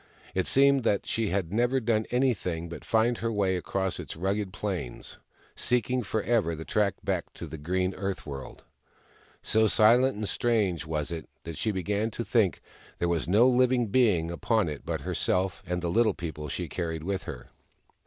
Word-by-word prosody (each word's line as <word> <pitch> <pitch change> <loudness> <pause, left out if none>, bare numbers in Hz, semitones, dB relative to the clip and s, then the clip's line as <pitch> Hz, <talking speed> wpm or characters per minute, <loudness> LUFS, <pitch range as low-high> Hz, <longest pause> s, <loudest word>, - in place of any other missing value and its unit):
It 95 - 0
seemed 140 -1 +4
that 100 -3 +1
she 115 -1 -1
had 95 -2 -1
never 120 +4 +2
done 110 -2 0
anything 100 -10 0
but 85 - -8
find 115 +1 +2
her 115 0 -1
way 100 -3 +1
across 95 +1 -2
its - - -6
rugged 95 +3 -1
plains, 95 -11 -5 0.4
seeking 125 +1 +1
ever 110 -3 0
for - - -3
the 80 +1 -7
track 105 -3 +1
back - - -2
to - - -7
the 80 -1 -8
green 90 +4 0
Earth 95 -1 -4
World. 70 -3 -8 0.8
So 110 0 +3
silent 120 +5 +5
and 105 -1 -2
strange 100 -10 0
was 75 0 -2
it 80 -2 -6
that 85 -1 -6
she 110 - -1
began 105 +3 -1
to 115 +1 -5
think 105 -8 +2 0.4
there 85 - 0
was 85 -2 0
no 105 +8 +5
living 125 -2 +3
being 100 -9 +3
upon 110 +3 +1
it 75 - -7
but - - -2
herself 95 +1 0
and 90 0 -2
the - - 0
Little 110 0 +3
People 75 -3 -5
she - - -3
carried 80 -3 -3
with 95 +2 -2
her. 65 -5 -8
100 Hz, 185 wpm, -28 LUFS, 85-115 Hz, 0.8 s, silent